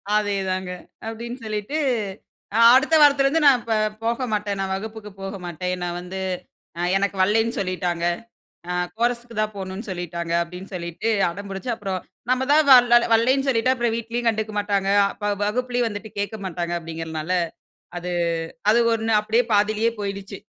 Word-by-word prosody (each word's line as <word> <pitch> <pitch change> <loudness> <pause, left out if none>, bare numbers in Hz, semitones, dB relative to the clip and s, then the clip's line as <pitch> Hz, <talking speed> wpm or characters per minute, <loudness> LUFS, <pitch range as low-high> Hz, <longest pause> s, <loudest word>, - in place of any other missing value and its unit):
அதேதாங்க 190 -3 -1 0.4
அப்டின்னு 235 +3 -6
சொல்லிட்டு, 215 +7 -3 1.0
அடுத்த 300 +5 +4
வாரத்துலருந்து 285 +1 +5
நான் 270 -3 +7
இப்ப 230 - -2 0.3
போகமாட்டேன். 220 -4 -1
நான் 195 0 -2
வகுப்புக்கு 215 +1 -7
போக 195 +1 -5
மாட்டேன். 180 +1 -3
நான் 175 0 -3
வந்து, 185 +2 -6 0.6
அ 175 - -3 0.2
எனக்கு 200 0 -1
வல்லைன்னு 220 +4 +2
சொல்லிட்டாங்க. 180 -2 -1 0.7
அ - - 0 0.2
கோரஸுக்கு 235 0 -1
தான் 215 0 -1
போகணும்னு 190 +3 -6
சொல்லிட்டாங்க. 170 -2 -4
அப்டின்னு 180 +3 -9
சொல்லிட்டு 170 +4 -4 0.2
அடம் 200 +3 -8
பிடிச்சு 195 +6 -4
அப்புறம் 195 -4 -3 0.3
நம்ம 255 +1 +2
தான் 310 +1 +6
வ - - +11 0.4
வல்லைன்னு 260 +4 +3
சொல்லிட்டு, 255 0 +3
அப்புறம் 235 -2 0
வீட்லயும் 235 +1 -2
கண்டுக்க 220 -1 -1
மாட்டாங்க. 200 -1 0 0.3
வ 205 - +1
வகுப்பிலயும் 245 +2 0
வந்துட்டு 210 0 -7
கேக்க 205 +2 -2
மாட்டாங்க. 175 -1 -3
அப்டிங்கிறதனால 160 0 -5 0.6
அது 175 +1 -4 0.6
அது 220 - +6
1 225 0 0
அப்டியே 220 +3 +2
பாதியிலயே 215 +2 +3
போயிடுச்சு. 200 -1 -5
210 Hz, 145 wpm, -23 LUFS, 185-230 Hz, 1.0 s, வ